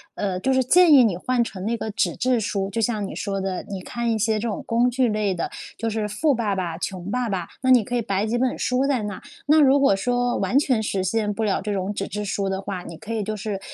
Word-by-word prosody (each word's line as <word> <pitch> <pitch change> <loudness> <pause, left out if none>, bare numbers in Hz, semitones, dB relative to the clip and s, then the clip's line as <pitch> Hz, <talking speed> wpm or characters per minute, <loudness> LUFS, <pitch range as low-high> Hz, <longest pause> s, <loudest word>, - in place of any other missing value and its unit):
呃， 195 -3 -2
就 265 - 0
是 260 0 +3
建 345 +6 +5
议 270 -3 +8
你 205 -6 +1
换 250 +7 0
成 190 -5 -7
那 230 +2 0
个 220 - -4
纸 210 - 0
质 250 -1 +2
书， 195 -1 -2
就 225 +3 -2
像 215 -3 -1
你 - - -8
说 195 -1 -3
的， 190 -1 -3
你 195 -2 -4
看 235 +5 -2
一 225 - +1
些 220 +1 +1
这 220 +3 -2
种 210 - -4
工 240 +2 +3
具 250 +1 +1
类 210 -3 0
的， 170 - -3 0.3
就 230 - -2
是 215 -1 -2
《富 285 +9 +1
爸 215 -4 -1
爸 175 -3 -3
穷 185 +1 -5
爸 245 +1 -1
爸》。 190 -3 -1 0.2
那 260 - +1
你 250 -3 +6
可 245 - -4
以 240 - +1
摆 200 -2 -1
几 225 +2 -1
本 255 0 0
书 255 +2 +1
在 270 -5 0
那， 205 -2 -5 0.3
那 305 +1 +6
如 280 0 +5
果 275 -8 +4
说 245 +4 0
完 255 - +1
全 255 -6 +1
实 195 -3 -1
现 210 +1 0
不 225 - -3
了 200 - 0
这 210 - -3
种 190 0 -2
纸 195 -1 -3
质 210 0 -4
书 195 0 -1
的 190 0 -2
话， 195 -2 -5
你 170 - -9
可 225 +4 -6
以 220 -2 -1
就 215 +2 -3
是， 205 -1 -4
215 Hz, 295 characters per minute, -23 LUFS, 195-245 Hz, 0.3 s, 议